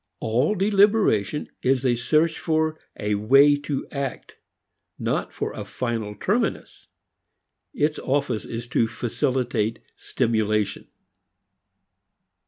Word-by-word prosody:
All 125 - +1
deliberation 200 - +2
is 130 0 +1
a 125 - +4
search 155 +7 +1
for 160 -1 0 0.2
a 105 0 -1
way 135 +8 +5
to 145 -1 -4
act, 140 -2 -5 0.6
not - - -2
for - - -4
a - - -6
final 115 -4 -3
terminus. 230 - -2 0.8
Its 155 - 0
office 135 -4 -1
is 115 +1 -6
to 115 -2 +2
facilitate 120 -1 -1 0.2
stimulation. 110 -3 -1
130 Hz, 100 wpm, -24 LUFS, 115-155 Hz, 0.8 s, way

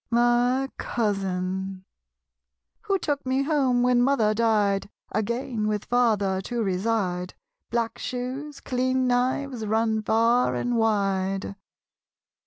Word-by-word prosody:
My 240 +2 +3
Cousin. 190 -3 -2 1.0
Who 395 - +2
took 290 -5 -2
me 260 +1 0
home 270 -5 +2
when 250 -1 +4
mother 245 -5 +3
died, 210 -3 +1 0.2
Again 220 +1 -1
with 210 -1 -1
father 210 -6 +2
to 235 +3 -2
reside, 185 -2 -1 0.3
Black 230 -1 -1
shoes, 260 +4 -5
clean 255 0 0
knives, 250 0 0
run 220 +1 +1
far 230 +3 +2
and 245 0 -1
wide? 195 -3 0
230 Hz, 105 wpm, -25 LUFS, 200-250 Hz, 1.0 s, when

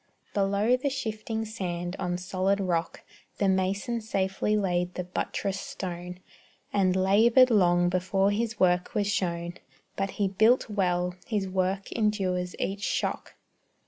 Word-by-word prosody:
Below 200 +4 +2
the 280 +3 -1
shifting 220 -4 -3
sand, 175 -4 -4
on 180 -1 -1
solid 185 +2 0
rock, 175 -3 -2 0.3
The 200 - +1
mason 195 +5 0
safely 195 0 0
laid 180 -3 0
the 180 - -2
buttress 190 +2 -3
stone, 180 -1 -6 0.5
And 185 -2 +2
labored 225 +7 +5
long 175 -4 +4
before 190 +2 +1
his 225 +1 -2
work 180 -1 +2
was 205 -1 +2
shown; 175 -3 -2 0.4
But 195 0 -1
he 200 - +2
built 220 +6 +3
well 180 -4 0
his 205 -4 -1
work 190 +1 -1
endures 190 -5 0
each 195 +1 -3
shock. - - -2
195 Hz, 135 wpm, -27 LUFS, 180-210 Hz, 0.5 s, labored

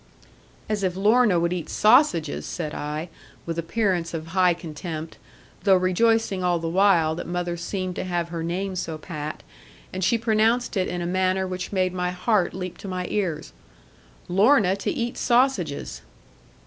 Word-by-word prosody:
'As 215 -1 -1
if 185 -2 0
Lorna 210 -1 +4
would 170 +1 0
eat 175 -3 -4
sausages!' 210 - +3
said 155 -4 -4
I, 150 +3 -4 0.4
with 170 0 -3
appearance 175 -1 -1
of 160 -1 -5
high 180 -2 +4
contempt, 160 -1 -7 0.4
though 195 -2 +5
rejoicing 195 +2 +2
all 175 -1 +2
the 165 0 -4
while 170 -3 +3
that 165 - -6
mother 175 0 -2
seemed 185 +1 -4
to - - -2
have 175 -2 -2
her 170 -1 -4
name 185 +3 -3
so 165 -3 -3
pat; 155 -1 -6 0.5
and 185 0 -3
she 235 - +3
pronounced 225 +2 +1
it 185 -2 +1
in 175 0 -3
a - - -3
manner 185 +1 +1
which 185 0 -5
made 185 -2 +1
my 180 -1 -1
heart 180 +1 0
leap 185 -2 -6
to - - -8
my 185 -1 -3
ears: 170 -7 -2 0.7
'Lorna 195 +1 +4
to 200 - -2
eat 240 +1 -3
sausages!' 240 - +1
185 Hz, 165 wpm, -24 LUFS, 170-200 Hz, 0.7 s, though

